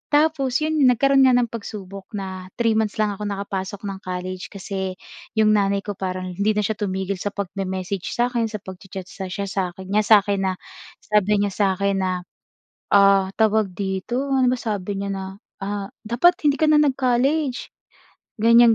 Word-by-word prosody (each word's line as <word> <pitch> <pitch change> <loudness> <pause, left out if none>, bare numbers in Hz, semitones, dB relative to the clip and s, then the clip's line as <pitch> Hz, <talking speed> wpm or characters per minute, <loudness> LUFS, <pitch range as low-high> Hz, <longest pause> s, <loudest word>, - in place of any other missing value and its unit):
Tapos 295 -3 +2
'yon 310 0 0
nagkaroon 270 +2 +5
nga 255 - +5
ng 245 -1 +2
pagsubok 200 -3 -7
na 190 -2 -5
3 230 -1 +3
months 220 -1 0
lang 210 -1 +2
ako 210 +1 -6
nakapasok 195 0 -4
ng 195 -1 -5
college 185 0 -5
kasi 190 -1 -4 0.4
'yong 215 -1 +4
nanay 200 -1 +2
ko 205 - -4
parang 185 -1 -3
hindi 200 +4 +1
na 210 - +1
siya 215 +1 -1
tumigil 190 -1 -2
sa 205 +2 -3
pagme-message 190 -1 -3
sa'kin, 240 -1 +1
sa 215 -1 -5
pagcha-chat 190 0 -8 0.2
siya 195 +2 -4
sa'kin 190 -1 -4
niya 210 +1 +3
sa'kin 205 -2 +5
na 190 - +1 0.5
sabi 210 -1 +2
niya 205 -1 0
sa 195 -2 +2
'kin 200 0 +1
na, 185 -1 -1 0.7
ah, 195 -1 +6
tawag 215 -3 +2
dito, 200 +8 -2
ano 260 -1 +3
ba 255 - -1
sabi 205 -3 -3
niya 200 0 -3
na, 195 0 -4 0.4
ah, 200 0 -3 0.2
"Dapat 345 +11 +4
hindi 285 - +3
ka 310 - +4
na 305 - +6
nag-college." 270 +1 +1 0.7
Ganyan, 230 +1 +7
200 Hz, 170 wpm, -22 LUFS, 190-235 Hz, 0.7 s, Ganyan